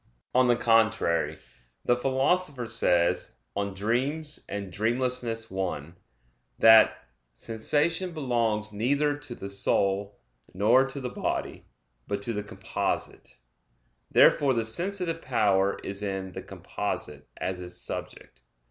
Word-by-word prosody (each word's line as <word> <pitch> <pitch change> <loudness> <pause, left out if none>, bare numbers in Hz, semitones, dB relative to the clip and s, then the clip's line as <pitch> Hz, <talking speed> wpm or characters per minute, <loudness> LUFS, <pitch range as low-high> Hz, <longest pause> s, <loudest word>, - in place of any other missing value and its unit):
On 125 0 +4
the 120 - +4
contrary, 115 -7 +2 0.5
The 120 - +4
Philosopher 135 +2 0
says 85 -6 +1 0.2
(De 100 - 0
Somno 100 0 -3 0.8
et 100 -2 -5
Vigilia 115 - -1
i) - - -18 0.6
that 110 - +6 0.3
"sensation 150 - 0
belongs 115 -8 0
neither 140 +7 +1
to 145 -4 -8
the 100 - -7
soul, 100 0 0 0.4
nor 120 +7 +4
to 135 +1 -6
the 125 -2 -4
body, - - -3 0.4
but 100 0 -3
to 115 - -2
the 105 - -2
composite." 105 +2 -4 0.7
Therefore 135 -3 +5
the 115 -1 0
sensitive 170 - 0
power 100 -6 +2
is 100 +1 -4
in 95 -2 -3
"the - - -7
composite" 75 -1 -5
as 95 -1 -3
its 90 -1 -6
subject. 65 -7 -7
115 Hz, 120 wpm, -27 LUFS, 100-130 Hz, 0.8 s, that